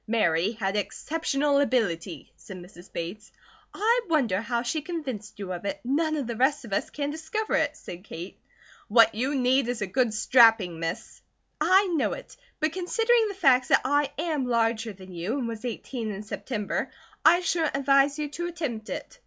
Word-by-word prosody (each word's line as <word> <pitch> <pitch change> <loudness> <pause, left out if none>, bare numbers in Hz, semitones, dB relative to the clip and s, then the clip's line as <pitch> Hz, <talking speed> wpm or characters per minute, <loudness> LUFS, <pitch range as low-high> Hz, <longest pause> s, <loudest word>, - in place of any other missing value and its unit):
"Mary 200 -3 +2
had 200 -3 -2
exceptional 285 +5 0
ability," 185 - -1
said 190 - -11
Mrs. 175 0 -13
Bates. 190 +6 -6 0.4
"I 460 +4 +2
wonder 240 - +2
how 235 +1 -1
she 300 +6 -1
convinced 270 - -6
you 195 -3 -5
of 175 - -6
it. 285 +9 -3
None 310 +5 0
of 285 -4 -2
the 235 0 -4
rest 265 +2 +2
of 205 - -7
us - - 0
can 290 -1 -3
discover 320 +8 -3
it," - - +1
said 175 +1 -9
Kate. 175 -2 -9 0.5
"What 225 +1 +5
you 260 +7 -1
need 260 0 +2
is 245 -3 -2
a - - 0
good 240 +5 +1
strapping, 220 -6 +4
Miss." 165 +1 -5 0.4
"I 375 +5 +5
know 340 -6 0
it; - - -10 0.2
but 310 0 0
considering 450 +5 +2
the 400 - -5
facts 265 -9 +4
that - - +4
I 285 +1 +2
am 305 -5 -1
larger 225 -1 +1
than 185 -2 -12
you, 180 +10 -3
and 250 -4 -2
was 230 +1 -6
eighteen 235 -1 -4
in 205 0 -5
September, 210 0 -3 0.3
I 345 +3 +6
shouldn't 325 -5 0
advise 275 +1 +3
you 300 -1 -2
to 345 +4 -4
attempt 290 -11 -5
it. - - -7
250 Hz, 185 wpm, -26 LUFS, 210-300 Hz, 0.5 s, I